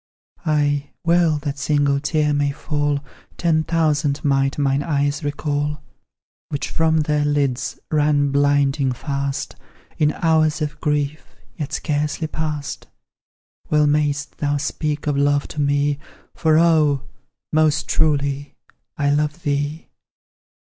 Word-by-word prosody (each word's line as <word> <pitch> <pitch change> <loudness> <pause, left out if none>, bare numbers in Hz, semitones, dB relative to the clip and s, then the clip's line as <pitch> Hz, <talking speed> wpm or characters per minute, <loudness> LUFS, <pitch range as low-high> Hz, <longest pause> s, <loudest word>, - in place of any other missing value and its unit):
Ay, 145 -2 +1
well 170 -2 +3
that 145 -1 -4
single 145 -1 +2
tear 150 0 +1
may 145 0 +1
fall; 145 0 -1 0.4
Ten 160 -2 +2
thousand 155 -3 0
might 135 -1 +2
mine 140 -1 +1
eyes 145 -1 0
recall, 145 0 -2 0.7
Which 145 - -3
from 160 -1 +2
their 150 0 +1
lids 145 -4 0
ran 145 -2 +2
blinding 140 -1 +2
fast, 140 +1 -3 0.4
In 150 -1 +4
hours 160 -1 +2
of 150 -1 -4
grief, 150 0 -2 0.2
yet 150 -4 -5
scarcely 150 +1 -1
past; 155 -2 -4 0.8
Well 150 -1 +4
mayst 145 -1 0
thou 145 -1 +1
speak 150 0 -2
of 145 -1 0
love 145 0 +2
to 150 - -3
me, 145 0 +1 0.3
For, 160 -1 +3
oh! 155 -5 +3 0.5
most 155 -1 +2
truly 145 -2 0 0.4
I 145 -1 +2
love 150 +3 0
thee! 145 +2 -2
145 Hz, 120 wpm, -21 LUFS, 145-155 Hz, 0.8 s, In